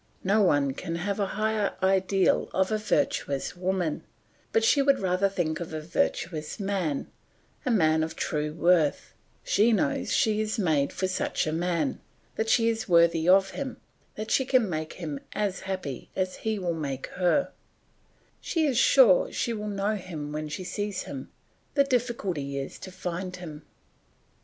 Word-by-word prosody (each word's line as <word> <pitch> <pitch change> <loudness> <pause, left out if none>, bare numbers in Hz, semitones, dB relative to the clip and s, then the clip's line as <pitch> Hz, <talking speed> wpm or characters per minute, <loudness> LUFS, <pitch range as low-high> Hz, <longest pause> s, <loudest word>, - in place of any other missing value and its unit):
No 205 +3 +3
one 145 -7 +3
can 165 +4 -5
have 195 +4 -2
a 200 - +1
higher 215 -1 0
ideal 190 0 +2
of 190 +2 +2
a 215 - +1
virtuous 145 -7 -1
woman, 180 -3 -1 0.5
but 225 - +2
she 280 +5 +4
would 275 0 +4
rather 190 +1 +1
think 165 -5 -1
of 165 -2 -5
a - - -2
virtuous 155 +1 -2
man, 190 -8 -1 0.6
a - - +3
man 160 -8 +3
of 160 0 -3
true 150 -1 -2
worth; 165 -2 +2 0.3
she 215 +4 +3
knows 280 +4 +1
that - - -1
she 215 -1 +2
is 215 +2 -2
made 155 -8 +1
for 190 - -1
such 185 0 -1
a 155 - -1
man, 165 -3 -1 0.3
that 220 0 -1
she 230 0 +4
is 225 -2 -1
worthy 170 -1 +4
of 190 +1 +5
him, 265 -3 -5 0.4
that 215 +1 -5
she 265 - +3
can 255 -3 +3
make 155 -3 -3
him 155 -5 -5
as 200 -3 -1
happy 155 -9 -4
as 185 -1 -1
he 220 -1 -2
will 180 -3 -1
make 140 -5 -4
her; 185 +10 +1 0.9
she 325 -3 0
is 265 -4 +2
sure - - +6
she 235 - -1
will 210 -1 -4
know 200 +1 0
him 155 -6 -6
when 155 0 -4
she 170 +5 -5
sees 205 +1 -3
him; 135 -2 -7 0.5
the 280 - +5
difficulty 200 - -1
is 135 0 -5
to 185 - -9
find 180 +1 -4
him. 160 -4 -8
185 Hz, 170 wpm, -27 LUFS, 160-215 Hz, 0.9 s, sure